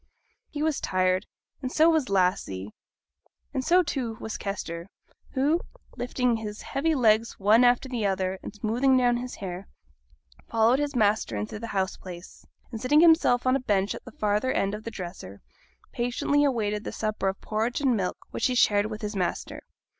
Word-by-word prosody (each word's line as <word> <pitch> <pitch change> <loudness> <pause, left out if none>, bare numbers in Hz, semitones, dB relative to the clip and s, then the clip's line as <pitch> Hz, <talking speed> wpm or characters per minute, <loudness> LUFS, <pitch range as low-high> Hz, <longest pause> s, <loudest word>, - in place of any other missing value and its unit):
He 295 -1 -3
was 315 -2 0
tired, 185 +1 +1 0.3
and 255 -2 -3
so 315 +3 +5
was 315 -7 +2
Lassie, 180 - 0 0.8
and 265 -2 -1
so, 360 +6 +4
too, 260 -7 -3
was 220 - -5
Kester, 170 -4 -5 0.5
who, 290 +6 +2 0.3
lifting 245 -1 0
his 210 -1 -6
heavy 315 +4 0
legs 225 -3 +3
one 215 +5 +5
after 245 +2 +3
the 245 -4 -3
other, 190 -1 -1
and - - -7
smoothing 235 +6 +2
down 245 -1 +3
his 245 +1 -6
hair, 190 0 -6 0.8
followed 230 +4 +3
his 290 -1 -2
master 210 - +1
into 105 - -4
the 230 - -6
house 190 -3 -1
place, 175 -1 -11 0.3
and 225 -2 -6
seating 295 +4 +4
himself 320 -7 +5
on 255 +1 +4
a - - +1
bench 200 -5 0
at - - -9
the 245 - -11
farther 210 +4 0
end 195 +1 0
of 210 +1 -6
the - - -3
dresser, 175 - -8 0.5
patiently 245 +4 +1
awaited 215 -6 0
the - - -5
supper 215 -2 -2
of 190 0 -2
porridge 225 +3 -1
and 265 -4 +2
milk 185 -4 -2
which - - 0
he 255 - -1
shared 205 -3 +4
with 215 0 -7
his 210 0 -3
master. 180 -2 -3
220 Hz, 180 wpm, -26 LUFS, 195-255 Hz, 0.8 s, so